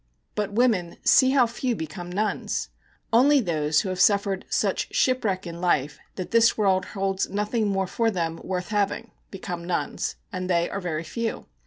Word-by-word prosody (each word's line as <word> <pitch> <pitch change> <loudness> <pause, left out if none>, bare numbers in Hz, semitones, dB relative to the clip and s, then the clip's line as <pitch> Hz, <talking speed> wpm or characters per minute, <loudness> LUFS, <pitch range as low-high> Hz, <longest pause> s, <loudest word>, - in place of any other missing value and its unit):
But 210 -1 -2
women, 210 -7 +1
see 260 - +6
how 265 -2 +5
few 235 +1 -2
become 175 +1 -6
nuns! 210 +4 -2 0.4
Only 280 +5 +6
those 155 - +1
who 190 - -4
have 185 -1 -3
suffered 200 -1 +2
such - - 0
shipwreck 210 -8 +1
in 170 0 -7
life 150 -5 +1 0.2
that 185 - -6
this 230 0 +4
world 190 -3 +2
holds 195 0 0
nothing 210 +2 -1
more 195 -1 0
for 230 +5 0
them 165 -5 -2
worth 180 -1 -3
having 210 +2 -1 0.2
become 180 -3 -6
nuns. 175 0 -2 0.2
And 185 0 -3
they 170 -1 +2
are 200 - -3
very 165 -3 -3
few. 230 +7 -4
195 Hz, 170 wpm, -25 LUFS, 175-225 Hz, 0.4 s, see